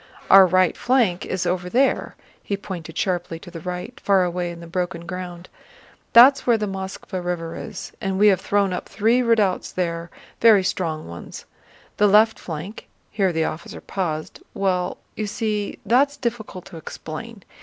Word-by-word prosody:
Our 195 -1 +9
right 185 0 +3
flank 240 -9 +1
is 185 -1 -2
over 180 0 -1
there"—he 240 -4 -1
pointed 175 -5 -7
sharply 175 -3 -1
to 175 +2 -12
the 165 - -7
right, 180 +8 -6
far 195 -2 +3
away 175 0 -2
in 170 0 -8
the 170 - -9
broken 170 0 -3
ground—"That's 185 +9 +1
where 235 -2 +5
the 210 - -2
Moskvá 190 -1 -5
River 170 -2 -3
is, - - -7
and 195 -3 -1
we 210 +1 +6
have 190 -2 +2
thrown 200 -2 +1
up 180 - -5
three 225 +5 +2
redoubts 220 -6 +1
there, 170 -2 -3 0.3
very 220 -4 +6
strong 165 -4 -2
ones. 85 +1 -9 0.5
The 210 - +5
left 215 +2 +5
flank..." 175 +6 -7 0.2
here 195 -4 +1
the 160 -1 0
officer 155 - -6
paused. 155 -5 -4
"Well, 185 -2 0 0.2
you 215 - -3
see, 210 0 -2
that's 280 +4 +3
difficult 220 -6 -4
to 175 - -10
explain.... 195 +7 -8
185 Hz, 160 wpm, -22 LUFS, 175-210 Hz, 0.5 s, Our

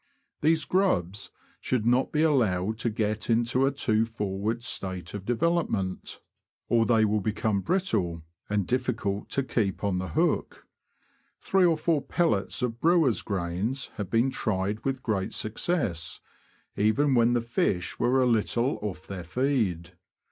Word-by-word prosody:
These 160 +1 +2
grubs 100 - 0 0.3
should 120 -4 -1
not 125 +3 +2
be 155 +1 +2
allowed 110 - +1
to 120 - 0
get 110 0 -2
into 120 +3 +2
a - - +2
too 115 -5 +1
forward 110 +1 -3
state 95 -6 -4
of 100 -1 -7
development, 120 - -1 0.5
or 115 -1 +3
they 115 -2 +4
will 105 0 +1
become 105 -1 0
brittle, 105 - -1 0.3
and 105 -2 0
difficult 115 -4 -1
to 135 - 0
keep 105 -7 -1
on 95 -3 0
the 95 - -3
hook. 80 - -1 0.7
Three 190 -1 +3
or 165 -2 +3
four 155 -1 +1
pellets 120 - 0
of 120 -1 -2
brewers' 165 -8 +3
grains 100 +7 -2
have 100 -4 -4
been 120 +5 +2
tried 105 -3 -2
with 135 -1 -2
great 100 -4 -1
success, 110 - -1 0.6
even 130 +7 +2
when 120 -1 +4
the 120 - +3
fish 100 -6 -1
were 130 +2 +3
a - - +3
little 120 +2 +1
off 100 -7 -5
their 95 -3 -6
feed. 95 - -1
115 Hz, 150 wpm, -27 LUFS, 100-130 Hz, 0.7 s, they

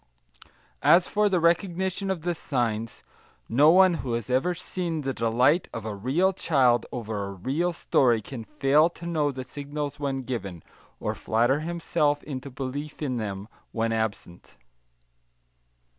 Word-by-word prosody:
As 175 +1 +5
for 210 0 +2
the 185 -2 +2
recognition 185 +3 0
of 180 -5 -2
the 175 0 0
signs, 115 -8 -2 0.4
no 145 +6 +5
one 185 +1 +6
who 125 -3 -3
has 115 +1 -3
ever 150 +8 +1
seen 170 -2 -3
the 135 -1 -2
delight 125 +9 +2
of 115 -2 -5
a 110 - -3
real 140 - +1
child 130 - +2
over 110 -4 -4
a 100 - -6
real 140 - -1
story 125 -7 +2
can 115 +2 -8
fail 150 +5 +3
to 170 - -12
know 155 -4 0
the 130 -1 -6
signals 145 +2 -5
when 135 -2 -2
given, 100 - -5 0.4
or - - -2
flatter 120 +6 +1
himself 155 -3 0
into 140 -2 -6
belief 140 +4 -5
in 130 -4 -1
them 100 -2 -4 0.2
when 115 0 -1
absent. 110 - -4
140 Hz, 150 wpm, -26 LUFS, 115-170 Hz, 0.4 s, one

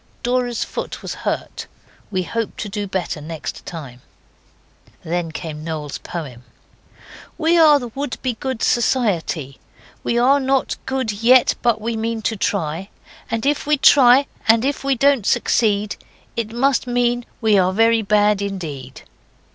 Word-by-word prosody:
Dora's 245 -1 0
foot - - -6
was - - -4 0.2
hurt. - - -5 0.4
We 185 -3 -1
hope 230 +4 -4
to 215 - -4
do 205 0 -4
better 185 -5 -3
next 160 +1 -7
time."' 135 -7 -8 1.0
Then 170 0 -2
came 155 -1 -6
Noel's 155 -3 -5
poem: 135 -8 -7 0.9
'We 335 +1 +3
are 305 -2 +7
the 245 -3 -7
Wouldbegoods 260 -2 -4
Society, 180 - 0 0.4
We 235 - 0
are 265 +4 +4
not 270 0 0
good 265 -4 -1
yet, 235 +5 +4
but 235 -2 +2
we 230 +1 -3
mean 225 0 -3
to 225 - 0
try, 185 -2 -2 0.4
And 230 +2 -2
if 290 0 0
we 300 0 +3
try, 270 -1 +6 0.2
and 225 +2 +5
if 280 0 -1
we 275 -1 +1
don't 275 -4 +2
succeed, 210 -3 +1 0.4
It 225 -2 -3
must 260 +2 +1
mean 245 0 +1 0.2
we 215 -4 +3
are 185 0 +2
very 225 +3 +3
bad 210 -1 +2
indeed. 155 -10 -6
225 Hz, 145 wpm, -20 LUFS, 185-250 Hz, 1.0 s, are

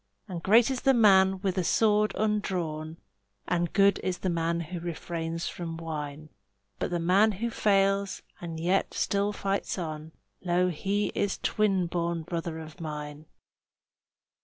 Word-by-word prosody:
And 175 -3 -5
great 225 +7 +5
is 260 - -2
the 270 -1 +4
man 190 -4 +5
with 190 -1 0
a - - +1
sword 210 +3 +3
undrawn, 175 -7 -1 0.5
And 175 -2 0
good 200 0 +4
is 185 -1 -2
the 185 +1 -1
man 170 0 0
who 175 +2 -5
refrains 165 0 -4
from 165 -2 -5
wine; 155 -2 -6 0.5
But - - -1
the 175 - -1
man 190 +6 +4
who 230 +5 -3
fails 195 -2 +1 0.2
and 165 -2 -6
yet 180 +4 +1
still 200 +1 +1
fights 200 -1 -2
on, 160 -2 -5 0.3
Lo, 180 0 +2
he 200 +5 -1
is 205 -1 -1
the - - -34
twin 195 -4 +2
born 170 -1 -2
brother 165 0 -4
of 160 0 -10
mine. 150 -1 -6
180 Hz, 155 wpm, -28 LUFS, 165-200 Hz, 0.5 s, great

